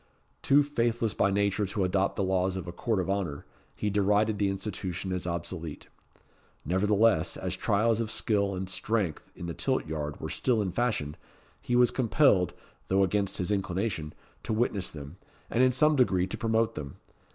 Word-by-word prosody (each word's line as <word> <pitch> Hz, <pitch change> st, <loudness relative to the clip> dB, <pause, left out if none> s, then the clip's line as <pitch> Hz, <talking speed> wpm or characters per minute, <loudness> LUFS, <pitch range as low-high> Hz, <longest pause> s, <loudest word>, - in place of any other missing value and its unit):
Too 145 Hz, +1 st, +5 dB
faithless 120 Hz, -5 st, 0 dB
by 100 Hz, -, +2 dB
nature 100 Hz, 0 st, +1 dB
to 95 Hz, +1 st, -1 dB
adopt 95 Hz, +1 st, +1 dB
the 100 Hz, -, 0 dB
laws 95 Hz, 0 st, +1 dB
of 95 Hz, -, -5 dB
a -, -, -4 dB
Court 105 Hz, +4 st, -1 dB
of 90 Hz, -, -1 dB
Honour, 95 Hz, -7 st, -2 dB, 0.3 s
he 105 Hz, -, -1 dB
derided 105 Hz, +1 st, +2 dB
the 100 Hz, -1 st, +2 dB
institution 95 Hz, -2 st, -3 dB
as 90 Hz, -1 st, -3 dB
obsolete. 85 Hz, -2 st, -5 dB, 0.8 s
Nevertheless, 100 Hz, 0 st, +2 dB
as 95 Hz, 0 st, -3 dB
trials 115 Hz, +1 st, +1 dB
of 110 Hz, -, -3 dB
skill 100 Hz, -3 st, 0 dB
and 95 Hz, 0 st, -4 dB
strength 95 Hz, -3 st, -2 dB
in 85 Hz, -, -7 dB
the 85 Hz, -, -4 dB
tilt -, -, -1 dB
yard 75 Hz, -1 st, -4 dB
were 80 Hz, -, -5 dB
still 125 Hz, -4 st, +1 dB
in 100 Hz, -3 st, -1 dB
fashion, 100 Hz, -9 st, -1 dB, 0.4 s
he 120 Hz, -, -1 dB
was 125 Hz, 0 st, +5 dB
compelled, 115 Hz, -, +3 dB, 0.3 s
though 95 Hz, +1 st, +3 dB
against 100 Hz, +1 st, 0 dB
his 90 Hz, +2 st, -2 dB
inclination, 95 Hz, -4 st, -2 dB, 0.3 s
to -, -, -3 dB
witness 110 Hz, -4 st, 0 dB
them, 75 Hz, +3 st, -9 dB, 0.3 s
and 120 Hz, -, +2 dB
in 130 Hz, 0 st, +5 dB
some 150 Hz, +4 st, +3 dB
degree 95 Hz, -9 st, +3 dB
to 95 Hz, -, -5 dB
promote 115 Hz, 0 st, +1 dB
them. 70 Hz, -6 st, -7 dB
100 Hz, 175 wpm, -28 LUFS, 90-110 Hz, 0.8 s, Too